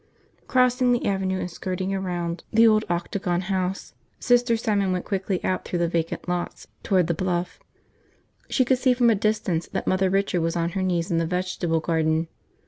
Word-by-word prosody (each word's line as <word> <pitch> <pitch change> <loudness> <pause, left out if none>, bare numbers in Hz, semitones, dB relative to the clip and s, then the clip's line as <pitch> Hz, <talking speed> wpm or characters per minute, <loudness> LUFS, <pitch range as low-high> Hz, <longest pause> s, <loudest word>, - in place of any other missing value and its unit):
Crossing 250 0 +3
the 240 - -1
avenue 190 -1 0
and 180 - -4
skirting 185 +2 -3
around 175 -3 -3
the 230 +1 +6
old 215 -1 +4
Octagon 175 +1 -1
House, 190 0 -3 0.3
Sister 245 -1 +3
Simon 205 -4 0
went 180 -1 -2
quickly 190 -1 -1
out 185 - 0
through 175 - -3
the 170 0 +1
vacant 165 0 -2
lots 175 0 -3 0.2
toward 185 -3 +2
the 170 - 0
bluff. 175 +1 -2 0.9
She 260 - +2
could 255 0 +2
see 255 -1 +3
from 240 -1 +4
a - - +3
distance 200 -5 0
that - - -4
Mother 185 0 +2
Richard 195 -2 +1
was 165 +1 -1
on 170 0 0
her 190 +2 -3
knees 180 -1 -1
in 165 - +2
the 165 - 0
vegetable 180 -2 -1
garden. 160 0 0
185 Hz, 185 wpm, -24 LUFS, 175-205 Hz, 0.9 s, the